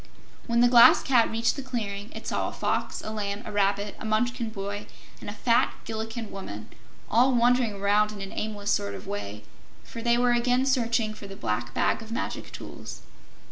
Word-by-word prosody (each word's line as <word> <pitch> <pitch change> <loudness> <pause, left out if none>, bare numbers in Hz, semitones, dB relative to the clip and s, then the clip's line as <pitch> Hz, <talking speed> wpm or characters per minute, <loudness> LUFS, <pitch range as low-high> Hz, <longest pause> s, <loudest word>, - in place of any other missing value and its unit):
When 235 0 +3
the 245 - +7
Glass 240 -1 +8
Cat 245 -4 +4
reached 230 +1 +1
the 280 - -4
clearing, 215 -5 -4
it - - -8
saw - - -1
a - - -9
Fox, - - -2
a 215 - -4
Lamb, 205 0 -3
a - - -6
Rabbit, 200 0 0
a - - -8
Munchkin 230 +2 0
boy 205 0 -5 0.3
and - - -7
a - - -5
fat 230 +2 +2
Gillikin 225 0 -5
woman, 105 - -7 0.4
all 250 +3 +4
wandering 240 -1 +3
around 205 +1 +2
in 210 - -8
an 195 0 -6
aimless 205 -1 -3
sort 100 0 0
of 95 - -9
way, 100 +1 -5 0.4
for 230 - -8
they 235 +1 +3
were 245 0 +3
again 245 +2 +2
searching 235 -4 +1
for 210 -1 -10
the 195 - -9
Black 120 - -3
Bag - - +1
of 225 0 -10
Magic 235 - -4
Tools. - - -9
215 Hz, 195 wpm, -27 LUFS, 200-235 Hz, 0.4 s, Glass